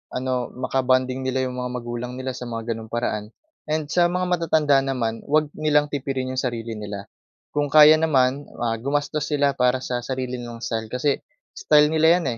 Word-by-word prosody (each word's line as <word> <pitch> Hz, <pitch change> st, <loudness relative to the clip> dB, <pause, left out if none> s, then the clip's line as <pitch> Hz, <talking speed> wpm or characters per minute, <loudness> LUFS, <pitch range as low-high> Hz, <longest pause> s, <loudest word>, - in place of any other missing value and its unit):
ano, 125 Hz, -1 st, -1 dB
maka-bonding 130 Hz, 0 st, 0 dB
nila 130 Hz, 0 st, 0 dB
yung 125 Hz, 0 st, -4 dB
mga 125 Hz, 0 st, -3 dB
magulang 120 Hz, 0 st, -5 dB
nila 130 Hz, 0 st, -4 dB
sa 125 Hz, -1 st, -7 dB
mga 115 Hz, 0 st, -4 dB
gano’ng 110 Hz, 0 st, -5 dB
paraan. 110 Hz, -3 st, -2 dB, 0.4 s
And 155 Hz, -1 st, -2 dB
sa 175 Hz, -1 st, +4 dB
mga 180 Hz, +1 st, -1 dB
matatanda 155 Hz, -5 st, +3 dB
naman, 125 Hz, -4 st, -2 dB
huwag 150 Hz, 0 st, +2 dB
nilang 150 Hz, -1 st, +2 dB
tipirin 135 Hz, -2 st, -3 dB
yung 130 Hz, -, -2 dB
sarili 120 Hz, -3 st, -3 dB
nila, 105 Hz, -2 st, -6 dB, 0.5 s
kung 145 Hz, 0 st, 0 dB
kaya 155 Hz, 0 st, +9 dB
naman, 140 Hz, -3 st, +2 dB
ah, 115 Hz, -1 st, 0 dB
gumastos 145 Hz, +3 st, -1 dB
sila 145 Hz, -1 st, +3 dB
para 125 Hz, +1 st, +3 dB
sa 125 Hz, -1 st, -2 dB
sarili 125 Hz, 0 st, -4 dB
nilang 120 Hz, -1 st, -8 dB
style. 110 Hz, -1 st, -3 dB
Kasi 135 Hz, +2 st, 0 dB, 0.4 s
style 150 Hz, -, +4 dB
nila 160 Hz, +3 st, +5 dB
'yan, 170 Hz, -, -5 dB
130 Hz, 180 wpm, -23 LUFS, 120-150 Hz, 0.5 s, kaya